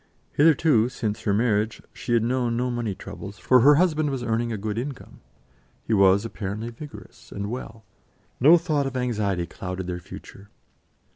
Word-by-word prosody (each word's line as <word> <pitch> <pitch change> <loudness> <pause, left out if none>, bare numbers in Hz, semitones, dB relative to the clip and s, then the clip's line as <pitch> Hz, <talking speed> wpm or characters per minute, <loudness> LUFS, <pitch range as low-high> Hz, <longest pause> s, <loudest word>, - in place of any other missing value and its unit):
Hitherto, 145 -6 +4
since 110 -4 -3
her 105 - +2
marriage, 110 -1 +1
she 120 - -4
had 115 -1 +3
known 120 -1 0
no 125 +1 -1
money 120 -5 -3
troubles, 100 +1 -9
for 130 +3 +4
her 145 +5 +7
husband 155 -2 +2
was 135 -3 -3
earning 115 0 -1
a 110 - -2
good 105 +2 -3
income; 135 +1 -8 0.6
he 115 - -2
was 100 +1 +4
apparently 110 +1 -5
vigorous 145 +5 -12
and 100 +2 -4
well: 115 -3 -7 0.6
no 155 +7 +7
thought 155 -5 0
of 130 -1 -4
anxiety 105 -8 -1
clouded 90 +1 -6
their 90 -1 -4
future. 100 +3 -12
115 Hz, 165 wpm, -24 LUFS, 100-130 Hz, 0.6 s, her